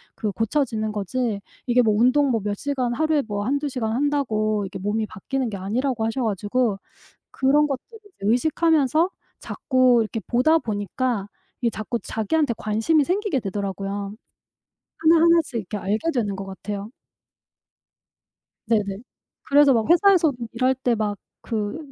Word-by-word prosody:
그 210 Hz, -2 st, -2 dB
고쳐지는 225 Hz, -2 st, -1 dB
거지." 210 Hz, +2 st, -2 dB, 0.3 s
이게 250 Hz, 0 st, +4 dB
뭐 220 Hz, -2 st, +3 dB
운동 260 Hz, +5 st, +4 dB
뭐 225 Hz, -, 0 dB
몇 205 Hz, 0 st, -1 dB
시간 260 Hz, -3 st, -1 dB
하루에 310 Hz, +2 st, +1 dB
뭐 205 Hz, -2 st, -3 dB
1-2 285 Hz, +4 st, 0 dB
시간 230 Hz, -4 st, -2 dB
한다고 225 Hz, -7 st, 0 dB
이게 195 Hz, 0 st, -7 dB
몸이 210 Hz, +3 st, -1 dB
바뀌는 250 Hz, +6 st, -3 dB
게 210 Hz, -, -5 dB
아니라고 225 Hz, +5 st, -1 dB
하셔 225 Hz, +4 st, -2 dB
가지고 210 Hz, +2 st, 0 dB, 0.6 s
그런 285 Hz, +3 st, +3 dB
것들을 295 Hz, -, -6 dB
이제 410 Hz, -2 st, -22 dB
의식하면서 310 Hz, -, +2 dB, 0.3 s
자꾸 255 Hz, -3 st, +2 dB
이렇게 225 Hz, +1 st, -4 dB
보다 285 Hz, +7 st, +4 dB
보니까 215 Hz, -1 st, -2 dB, 0.3 s
이게 235 Hz, -2 st, +1 dB
자꾸 220 Hz, +2 st, -4 dB
자기한테 235 Hz, +5 st, 0 dB
관심이 225 Hz, +9 st, +1 dB
생기게 365 Hz, -, 0 dB
되더라고요. 200 Hz, 0 st, -4 dB, 0.8 s
하나하나씩 330 Hz, -2 st, +4 dB
이렇게 210 Hz, -2 st, -3 dB
알게 210 Hz, -, -1 dB
되는 210 Hz, -6 st, -1 dB
것 195 Hz, 0 st, -6 dB
같아요. 200 Hz, +2 st, -6 dB, 1.8 s
네네. 200 Hz, -4 st, 0 dB, 0.5 s
그래서 285 Hz, 0 st, +6 dB
막 225 Hz, -3 st, +1 dB
회사에서도 345 Hz, -5 st, +5 dB, 0.2 s
일할 255 Hz, +1 st, +2 dB
때 255 Hz, -2 st, 0 dB
막 210 Hz, -2 st, -2 dB, 0.3 s
그 215 Hz, +3 st, -3 dB
235 Hz, 315 characters per minute, -23 LUFS, 210-285 Hz, 1.8 s, 그래서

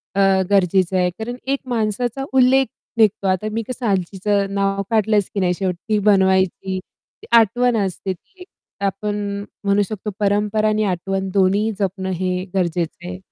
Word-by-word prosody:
अ, 195 Hz, -1 st, +4 dB
गरजेचं 190 Hz, -1 st, +3 dB
आहे 180 Hz, -1 st, +2 dB
कारण 240 Hz, +2 st, -4 dB
एक 275 Hz, 0 st, +1 dB
माणसाचा 240 Hz, +3 st, -1 dB
उल्लेख 265 Hz, +1 st, +5 dB, 0.3 s
निघतो. 210 Hz, -3 st, +3 dB
आता 185 Hz, +3 st, 0 dB
मी 225 Hz, 0 st, -1 dB
कसं 250 Hz, -1 st, -5 dB
आजीचं 195 Hz, +1 st, 0 dB
नाव 195 Hz, 0 st, +1 dB
काढलंच 215 Hz, -2 st, +2 dB
की 200 Hz, -, -1 dB
नाही 180 Hz, -1 st, +2 dB
शेवटी 185 Hz, -2 st, -2 dB, 0.2 s
ती -, -, +2 dB
बनवायची. 190 Hz, -1 st, +2 dB, 0.5 s
आठवण 235 Hz, +1 st, +4 dB
असते 190 Hz, +1 st, -3 dB
ती 360 Hz, -, -22 dB
एक. 360 Hz, -, -10 dB, 0.3 s
तर -, -, +1 dB
आपण 205 Hz, +2 st, -2 dB, 0.5 s
म्हणू 200 Hz, 0 st, +3 dB
शकतो 210 Hz, +1 st, -5 dB
परंपरा 210 Hz, +1 st, +1 dB
आणि 215 Hz, 0 st, +1 dB
आठवण 190 Hz, +1 st, -2 dB
दोन्हीही 200 Hz, +3 st, +2 dB
जपणं 190 Hz, -1 st, -2 dB
हे 185 Hz, 0 st, -1 dB
गरजेचं 175 Hz, -1 st, -1 dB
आहे. 180 Hz, 0 st, -5 dB
200 Hz, 160 wpm, -20 LUFS, 190-215 Hz, 0.5 s, उल्लेख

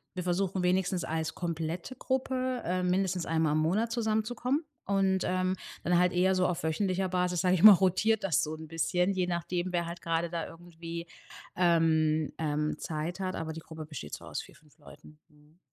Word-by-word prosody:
wir 180 Hz, -, -3 dB
versuchen, 185 Hz, +1 st, 0 dB
wenigstens 180 Hz, 0 st, +1 dB
als 160 Hz, 0 st, -2 dB
komplette 170 Hz, -, -4 dB
Gruppe, 255 Hz, -1 st, -1 dB
ähm, 180 Hz, +1 st, 0 dB
mindestens 185 Hz, -1 st, 0 dB
einmal 160 Hz, -1 st, +1 dB
im 155 Hz, -, +2 dB
Monat 200 Hz, +9 st, +1 dB
zusammenzukommen 235 Hz, +5 st, 0 dB, 0.2 s
und, 195 Hz, -1 st, +2 dB
ähm, 185 Hz, 0 st, 0 dB, 0.3 s
dann 175 Hz, 0 st, +3 dB
halt 180 Hz, 0 st, +3 dB
eher 185 Hz, +2 st, +3 dB
so 185 Hz, -1 st, +2 dB
auf 175 Hz, -, -2 dB
wöchentlicher 185 Hz, +3 st, 0 dB
Basis, 180 Hz, -1 st, 0 dB
sage 180 Hz, -1 st, +3 dB
ich 180 Hz, -, +1 dB
mal, 215 Hz, -1 st, +12 dB
rotiert 195 Hz, +4 st, +2 dB
das 175 Hz, -7 st, +2 dB
so 155 Hz, +1 st, -3 dB
'n 160 Hz, 0 st, -9 dB
bisschen, 180 Hz, +4 st, +1 dB
je 185 Hz, -2 st, 0 dB
nachdem, 175 Hz, +1 st, -2 dB
wer 175 Hz, -1 st, 0 dB
halt 170 Hz, +1 st, -7 dB
gerade 165 Hz, 0 st, -1 dB
da 170 Hz, -1 st, -3 dB
irgendwie, 170 Hz, 0 st, -8 dB, 0.5 s
ähm, 160 Hz, -3 st, +2 dB
ähm, 150 Hz, -1 st, -1 dB
Zeit 160 Hz, +3 st, -4 dB
hat, 185 Hz, -1 st, -2 dB
aber 160 Hz, -1 st, -4 dB
die 165 Hz, -, -7 dB
Gruppe 160 Hz, -1 st, -9 dB
besteht 140 Hz, -, -7 dB
so -, -, -12 dB
aus -, -, -4 dB
4, -, -, -15 dB
5 150 Hz, +1 st, -24 dB
Leuten. 150 Hz, +1 st, -15 dB
Mhm. 150 Hz, +2 st, -25 dB
175 Hz, 190 wpm, -30 LUFS, 160-190 Hz, 0.5 s, mal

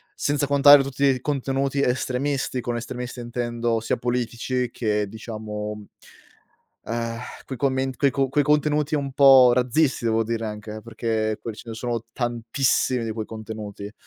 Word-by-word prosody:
Senza 145 Hz, -1 st, 0 dB
contare 145 Hz, 0 st, +8 dB
tutti 135 Hz, +1 st, -3 dB
i 130 Hz, -2 st, +2 dB
contenuti 135 Hz, -1 st, -1 dB
estremisti, 130 Hz, +1 st, 0 dB
con 120 Hz, -1 st, -3 dB
estremisti 125 Hz, +1 st, -5 dB
intendo 120 Hz, -1 st, -2 dB
sia 115 Hz, -, -1 dB
politici 125 Hz, 0 st, -2 dB
che 105 Hz, -3 st, -1 dB
diciamo 105 Hz, -1 st, -6 dB, 1.0 s
ehm, 115 Hz, 0 st, -3 dB, 0.3 s
quei 130 Hz, -, -5 dB
comment 130 Hz, 0 st, 0 dB
quei 140 Hz, -2 st, +3 dB
co 135 Hz, 0 st, 0 dB
quei 145 Hz, +2 st, +2 dB
contenuti 150 Hz, +1 st, +1 dB
un 140 Hz, -2 st, -1 dB
po' 130 Hz, -2 st, +7 dB
razzisti 130 Hz, +1 st, +1 dB
devo 115 Hz, 0 st, +2 dB
dire 115 Hz, 0 st, -3 dB
anche 105 Hz, 0 st, -6 dB
eh, 110 Hz, -, -8 dB
perché 110 Hz, -1 st, -2 dB
quel 115 Hz, -2 st, -6 dB
ce 115 Hz, -, -11 dB
ne -, -, -5 dB
sono 115 Hz, 0 st, -3 dB
tantissimi 120 Hz, +1 st, 0 dB
di 115 Hz, -, -3 dB
quei 110 Hz, 0 st, -4 dB
contenuti. 105 Hz, -2 st, -7 dB
120 Hz, 155 wpm, -24 LUFS, 115-135 Hz, 1.0 s, contare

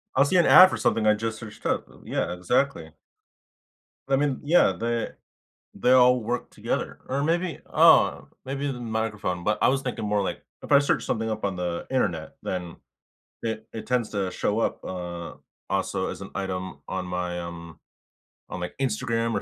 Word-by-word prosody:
I'll 135 Hz, -, +5 dB
see 165 Hz, -, 0 dB
an 175 Hz, -, +5 dB
ad 185 Hz, 0 st, +9 dB
for -, -, -3 dB
something 110 Hz, -1 st, +1 dB
I 105 Hz, -, +6 dB
just 110 Hz, +1 st, -3 dB
searched 110 Hz, -2 st, -11 dB
up, -, -, 0 dB, 0.2 s
yeah, -, -, -2 dB
exactly. 125 Hz, +10 st, 0 dB, 1.2 s
I 135 Hz, -, +4 dB
mean, 140 Hz, -1 st, 0 dB
yeah, 165 Hz, +5 st, +4 dB
they 115 Hz, 0 st, -1 dB, 0.7 s
they 125 Hz, -, +1 dB
all 125 Hz, -1 st, +6 dB
work 120 Hz, +3 st, -3 dB
together -, -, -3 dB
or 140 Hz, +2 st, 0 dB
maybe, 170 Hz, +2 st, 0 dB
oh, -, -, +5 dB, 0.2 s
maybe 140 Hz, +2 st, -2 dB
the 130 Hz, -, -5 dB
microphone, 110 Hz, -6 st, -2 dB
but 105 Hz, +4 st, +1 dB
I -, -, +4 dB
was 135 Hz, +1 st, +1 dB
thinking 125 Hz, -4 st, -4 dB
more 105 Hz, -1 st, +1 dB
like -, -, -3 dB, 0.2 s
if -, -, -10 dB
I 140 Hz, -, +8 dB
search 145 Hz, -, +1 dB
something 110 Hz, -1 st, -1 dB
up 110 Hz, 0 st, -4 dB
on 100 Hz, -2 st, -1 dB
the 90 Hz, -1 st, -3 dB
Internet, 90 Hz, -12 st, -1 dB
then 90 Hz, -2 st, -4 dB, 0.7 s
it 110 Hz, -1 st, -3 dB
it 110 Hz, -, -7 dB
tends 125 Hz, -3 st, +1 dB
to 100 Hz, -3 st, -1 dB
show 105 Hz, +4 st, -1 dB
up, -, -, -1 dB
uh, 85 Hz, -2 st, -6 dB, 0.4 s
also -, -, -1 dB
as -, -, -8 dB
an -, -, -8 dB
item 95 Hz, -2 st, -4 dB
on 90 Hz, -, -3 dB
my 90 Hz, -1 st, -3 dB
um 85 Hz, -2 st, -8 dB, 0.7 s
on -, -, -5 dB
my 90 Hz, 0 st, -3 dB
Instagram 115 Hz, -2 st, 0 dB
or -, -, -1 dB
110 Hz, 180 wpm, -26 LUFS, 90-130 Hz, 1.2 s, ad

